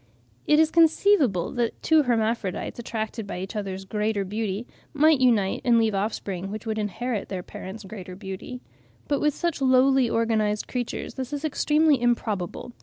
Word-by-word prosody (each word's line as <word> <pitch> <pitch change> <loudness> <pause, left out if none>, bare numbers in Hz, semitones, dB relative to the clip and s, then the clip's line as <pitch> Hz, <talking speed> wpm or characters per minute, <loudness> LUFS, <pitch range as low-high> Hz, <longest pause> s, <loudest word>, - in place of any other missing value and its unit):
It 300 0 +5
is 320 0 +4
conceivable 320 - +3
that 240 -3 -2
two 320 -1 +5
hermaphrodites, 225 -6 -1
attracted 225 -2 -4
by 195 - -5
each 190 +4 -6
other's 195 -2 -4
greater 210 0 -1
beauty, 210 +2 -3 0.3
might 305 0 +5
unite 225 -7 +2
and 240 -2 +4
leave 225 -2 +2
offspring 195 -2 -3
which 215 +2 -6
would 220 -1 -2
inherit 215 +1 -3
their 185 -2 -4
parents' 195 +5 -8
greater 190 -2 -8
beauty. 195 +5 -7 0.5
But 285 -1 +1
with 300 -1 +2
such 340 -4 -2
lowly 260 -1 +4
organised 220 -2 0
creatures 245 -2 -4
this 260 0 -5
is 290 +1 -3
extremely 300 -2 +2
improbable. 230 -2 -1
225 Hz, 160 wpm, -25 LUFS, 200-265 Hz, 0.5 s, It